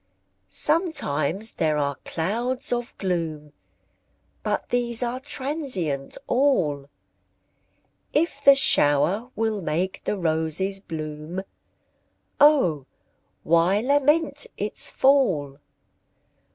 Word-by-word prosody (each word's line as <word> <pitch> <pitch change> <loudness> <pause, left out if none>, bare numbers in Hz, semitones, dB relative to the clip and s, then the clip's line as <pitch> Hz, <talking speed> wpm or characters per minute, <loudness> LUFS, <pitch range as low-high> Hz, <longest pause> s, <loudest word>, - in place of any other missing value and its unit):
Sometimes 220 - +1
there 155 -1 0
are 140 -1 0
clouds 235 +11 -2
of 240 0 -4
gloom, 160 -6 -3 0.9
But - - -3
these 240 -1 +2
are 245 +1 -3
transient 260 - -2
all; 175 - +1 1.2
If 295 -2 -1
the 280 -1 +8
shower 185 - +3
will 220 -2 -1
make 175 +4 -3
the 210 - -2
roses 165 +3 -1
bloom, 155 0 -6 1.0
O 180 - +4 0.6
why 170 +5 +3
lament 290 +3 +1
its 210 +1 -3
fall? 185 - +2
195 Hz, 85 wpm, -24 LUFS, 155-260 Hz, 1.2 s, the